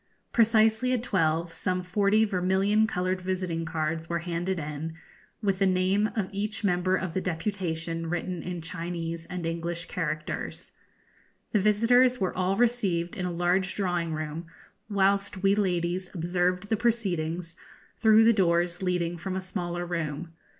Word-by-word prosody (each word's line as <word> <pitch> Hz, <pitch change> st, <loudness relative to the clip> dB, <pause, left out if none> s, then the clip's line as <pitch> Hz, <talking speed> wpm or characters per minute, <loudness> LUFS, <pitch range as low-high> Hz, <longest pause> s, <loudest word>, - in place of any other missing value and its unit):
Precisely 225 Hz, +2 st, +4 dB
at 245 Hz, -2 st, 0 dB
twelve 165 Hz, -5 st, +1 dB
some 185 Hz, -1 st, -1 dB
forty 205 Hz, +4 st, +3 dB
vermilion 195 Hz, +2 st, +2 dB
coloured 185 Hz, -2 st, -1 dB
visiting 180 Hz, -3 st, -2 dB
cards 160 Hz, 0 st, -2 dB
were 170 Hz, -, 0 dB
handed 175 Hz, +2 st, -2 dB
in, 150 Hz, +2 st, -5 dB, 0.5 s
with 195 Hz, -2 st, +1 dB
the 195 Hz, -, +4 dB
name 190 Hz, +3 st, +2 dB
of 210 Hz, -4 st, 0 dB
each 205 Hz, +2 st, -3 dB
member 185 Hz, -1 st, +2 dB
of 185 Hz, -3 st, -3 dB
the 190 Hz, -, 0 dB
deputation 165 Hz, -2 st, -3 dB
written 175 Hz, +1 st, -2 dB
in 175 Hz, -2 st, -5 dB
Chinese 165 Hz, 0 st, -4 dB
and 180 Hz, -2 st, -5 dB
English 170 Hz, +1 st, -3 dB
characters. 155 Hz, -3 st, -4 dB, 0.8 s
The 210 Hz, -, +3 dB
visitors 235 Hz, +5 st, +4 dB
were 190 Hz, -2 st, -1 dB
all 185 Hz, +1 st, +1 dB
received 200 Hz, -8 st, +1 dB
in 180 Hz, -1 st, -2 dB
a -, -, -2 dB
large 175 Hz, +2 st, +1 dB
drawing 175 Hz, -4 st, -1 dB
room, 155 Hz, +1 st, -4 dB, 0.4 s
whilst 200 Hz, -1 st, +1 dB
we 195 Hz, 0 st, +5 dB
ladies 180 Hz, -2 st, 0 dB
observed 180 Hz, +3 st, 0 dB
the 220 Hz, -, +2 dB
proceedings 180 Hz, -7 st, -1 dB, 0.4 s
through 220 Hz, 0 st, +6 dB
the 230 Hz, +1 st, +6 dB
doors 175 Hz, -2 st, +2 dB
leading 175 Hz, -2 st, -1 dB
from 190 Hz, +2 st, -4 dB
a -, -, 0 dB
smaller 175 Hz, -1 st, -3 dB
room. 165 Hz, -1 st, -3 dB
180 Hz, 150 wpm, -28 LUFS, 170-200 Hz, 0.8 s, through